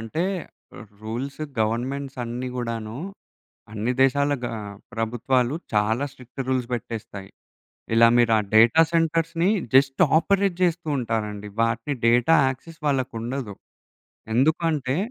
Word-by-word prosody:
అంటే, 135 Hz, +10 st, -2 dB, 0.8 s
rules 125 Hz, +7 st, -5 dB, 0.2 s
governments 130 Hz, +5 st, -2 dB
అన్నీ 125 Hz, +2 st, -4 dB
గూడాను 115 Hz, -2 st, -4 dB, 0.8 s
అన్ని 110 Hz, +3 st, -1 dB
దేశాల 140 Hz, +2 st, +3 dB
గ -, -, -3 dB, 0.5 s
ప్రభుత్వాలు 120 Hz, +3 st, 0 dB, 0.2 s
చాలా 110 Hz, +5 st, +1 dB
స్ట్రిక్ట్ 130 Hz, 0 st, -11 dB
రూల్స్ 130 Hz, -2 st, 0 dB
బెట్టేస్తాయి. 110 Hz, -4 st, -6 dB, 0.6 s
ఇలా 115 Hz, 0 st, +7 dB
మీరా 120 Hz, -2 st, +4 dB, 0.2 s
డేటా 115 Hz, +9 st, +7 dB
సెంటర్స్‌ని 165 Hz, +1 st, +1 dB, 0.2 s
జస్ట్ 135 Hz, +4 st, +4 dB
ఆపరేట్ 195 Hz, +2 st, +2 dB
జేస్తూ 175 Hz, -2 st, +1 dB
ఉంటారండి. 105 Hz, -3 st, -3 dB
వాటి 115 Hz, +5 st, 0 dB
డేటా 120 Hz, +7 st, +4 dB
యాక్సెస్ 160 Hz, +6 st, -8 dB
వాళ్ళకుండదు. 130 Hz, -4 st, -2 dB, 0.8 s
ఎందుకంటే, 150 Hz, 0 st, +1 dB
125 Hz, 105 wpm, -24 LUFS, 115-145 Hz, 0.8 s, ఇలా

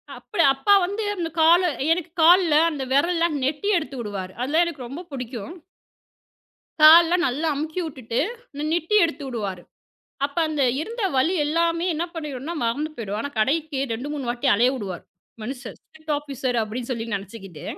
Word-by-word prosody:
அப்படி 245 Hz, 0 st, -1 dB
அப்பா 340 Hz, +10 st, +3 dB
வந்து 405 Hz, +4 st, -3 dB
அந்தக் 335 Hz, -3 st, -5 dB
காலு 345 Hz, +3 st, +5 dB, 0.2 s
எனக்குக் 335 Hz, 0 st, -2 dB
கால்ல 340 Hz, -1 st, +6 dB, 0.2 s
அந்த 280 Hz, -3 st, -4 dB
விரல் 315 Hz, +6 st, +3 dB
எல்லாம் 330 Hz, -3 st, +1 dB
நெட்டி 295 Hz, +9 st, -1 dB
எடுத்து 275 Hz, -5 st, -5 dB
விடுவாரு. 195 Hz, -4 st, -5 dB
அதெல்லாம் 310 Hz, +7 st, +2 dB
எனக்கு 280 Hz, -8 st, -6 dB
ரொம்ப 280 Hz, +7 st, -7 dB
பிடிக்கும். 255 Hz, -, -6 dB, 1.3 s
கால்லாம் 335 Hz, +3 st, +8 dB
நல்லா 290 Hz, +6 st, -1 dB
அமுக்கி 315 Hz, +4 st, -3 dB
விட்டுட்டு, 260 Hz, -7 st, -5 dB, 0.4 s
இந்த 290 Hz, -, -5 dB
நெட்டி 345 Hz, +5 st, 0 dB
எடுத்துவுடுவாரு. 235 Hz, -, -3 dB, 0.6 s
அப்ப 285 Hz, +3 st, -9 dB
அந்த, 300 Hz, -3 st, 0 dB, 0.2 s
இருந்த 455 Hz, +5 st, -5 dB
வலி 290 Hz, +8 st, +2 dB
எல்லாமே 335 Hz, +2 st, +1 dB
என்ன 320 Hz, +2 st, -1 dB
பண்ணிடும்னா, 300 Hz, 0 st, -5 dB
மறந்து 280 Hz, +7 st, -1 dB
போயிடும். 210 Hz, -3 st, -4 dB
ஆனா, 285 Hz, -, -3 dB
கடைக்கு 290 Hz, +4 st, 0 dB
2, 250 Hz, +6 st, -5 dB
3 285 Hz, -3 st, -4 dB
வாட்டி 245 Hz, +3 st, -1 dB
அலைய 245 Hz, +5 st, +3 dB
விடுவார், 190 Hz, -6 st, -6 dB, 0.4 s
மனுஷர். 250 Hz, +1 st, -7 dB
ஸ்டிரிக்ட் 315 Hz, -1 st, -6 dB
ஆஃபிசர் 270 Hz, -4 st, -3 dB
அப்படின்னு 230 Hz, +3 st, -5 dB
சொல்லி 230 Hz, -2 st, -3 dB
நெனைச்சுக்கிட்டு. 195 Hz, -5 st, -9 dB
290 Hz, 155 wpm, -23 LUFS, 245-330 Hz, 1.3 s, கால்லாம்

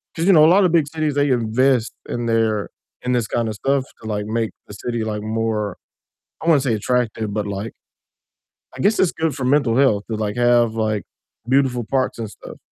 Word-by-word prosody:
'cause, 165 Hz, -, -1 dB
you 195 Hz, -, +7 dB
know, 155 Hz, -1 st, +7 dB
a -, -, +7 dB
lotta 190 Hz, -2 st, +5 dB
big 160 Hz, -3 st, +2 dB
cities, 155 Hz, -2 st, -2 dB
they 145 Hz, 0 st, +2 dB
invest 120 Hz, +1 st, +1 dB, 0.2 s
in 120 Hz, 0 st, -2 dB
their, 110 Hz, -2 st, +1 dB, 0.3 s
in 125 Hz, -, -1 dB
this 120 Hz, -3 st, 0 dB
kinda 115 Hz, -2 st, -1 dB
stuff 135 Hz, +5 st, 0 dB, 0.2 s
to, 110 Hz, -, -8 dB
like, 105 Hz, 0 st, -2 dB
make 115 Hz, 0 st, -1 dB, 0.2 s
the 105 Hz, -, -10 dB
city, 120 Hz, +2 st, -3 dB
like, 105 Hz, -1 st, -3 dB
more 110 Hz, -2 st, -2 dB, 0.6 s
I -, -, -7 dB
wouldn't 145 Hz, -5 st, +4 dB
say 115 Hz, -, +2 dB
attractive, 110 Hz, -2 st, -1 dB
but, 105 Hz, -1 st, -2 dB
like 100 Hz, +3 st, -5 dB, 1.0 s
I -, -, -4 dB
guess 215 Hz, +2 st, +2 dB
it's 185 Hz, -, +3 dB
good 160 Hz, -2 st, -1 dB
for 130 Hz, -3 st, -3 dB
mental 130 Hz, -4 st, +2 dB
health 110 Hz, -7 st, +3 dB
to, -, -, 0 dB
like, 105 Hz, -1 st, -2 dB
have, 120 Hz, -2 st, +3 dB
like, 110 Hz, -2 st, -1 dB, 0.5 s
beautiful 130 Hz, -3 st, +2 dB
parks 130 Hz, -2 st, -1 dB
and 110 Hz, -2 st, -4 dB
stuff -, -, -12 dB
120 Hz, 205 wpm, -21 LUFS, 110-135 Hz, 1.0 s, you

